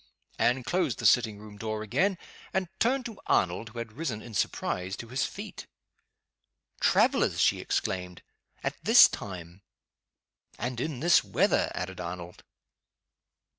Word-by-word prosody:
Anne 125 +1 +2
closed 180 +8 0
the - - -5
sitting 110 -4 +4
room 105 0 -12
door 110 -1 -3
again, 185 - +1 0.4
and 190 -2 0
turned 255 +3 +2
to 225 -4 -7
Arnold 90 +5 +1
who 115 - -13
had 115 -1 -5
risen, 125 -4 -4
in 115 +1 -11
surprise, 95 -1 -1
to 115 - -8
his 130 +2 0
feet. - - -8 1.1
"Travelers!" - - +3
she - - +3
exclaimed. 90 -1 -3 0.4
"At - - -4
this - - +9
time!" 90 -1 -8 1.0
"And 120 0 -3
in 140 -4 -3
this 170 0 +5
weather!" - - +2
added 90 0 -5
Arnold. 85 0 -7
110 Hz, 135 wpm, -28 LUFS, 95-135 Hz, 1.1 s, this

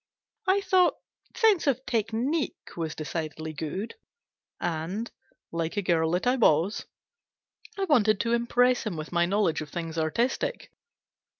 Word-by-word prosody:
I 385 +2 +4
thought 370 -2 +4 0.2
" - - -29
sense 435 -9 +4
of 260 -1 +1
technique" 235 +7 -1
was 160 -2 -3
decidedly 155 0 -4
good, 165 +8 -4 0.7
and, 175 +7 -3 0.4
like 165 +2 -2
a 205 - +1
girl 165 -3 +2
that 180 - 0
I 250 +2 +3
was, 180 - +2 0.9
I 390 - -1
wanted 220 - +4
to 230 0 0
impress 245 +1 +3
him 205 -7 -4
with 155 0 -6
my 175 0 +2
knowledge 195 -4 +1
of 155 - -7
things 165 0 -4
artistic. 235 - -1
205 Hz, 140 wpm, -27 LUFS, 165-250 Hz, 0.9 s, I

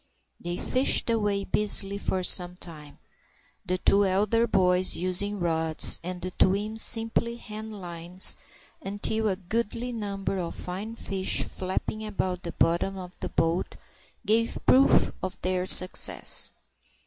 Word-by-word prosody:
They 175 +1 -5
fished 255 -2 +2
away 205 -3 0
busily 200 -1 -1
for 185 -2 -2
some 180 0 +5
time, 155 -5 -10 0.7
the 185 -1 -2
two 200 +2 +3
elder 210 +4 +1
boys 185 -2 +4
using 185 +3 -1
rods, 160 -2 +1
and 180 0 -6
the 185 - -4
twins 210 +5 +1
simply 230 0 0
hand 215 -2 -9
lines, 175 +1 -1 0.5
until 215 0 -2
a 195 - 0
goodly 230 +5 -3
number 200 -4 -4
of 170 -2 -5
fine 200 +5 -7
fish 195 -4 -1
flapping 190 +3 -4
about 190 -4 -3
the 170 -2 -7
bottom 175 +4 0
of 180 -1 -8
the - - -5
boat 165 +2 -1 0.5
gave 230 +2 +1
proof 265 +2 +4
of 185 0 -5
their 185 0 -1
success. 185 0 +5
195 Hz, 135 wpm, -26 LUFS, 180-215 Hz, 0.7 s, some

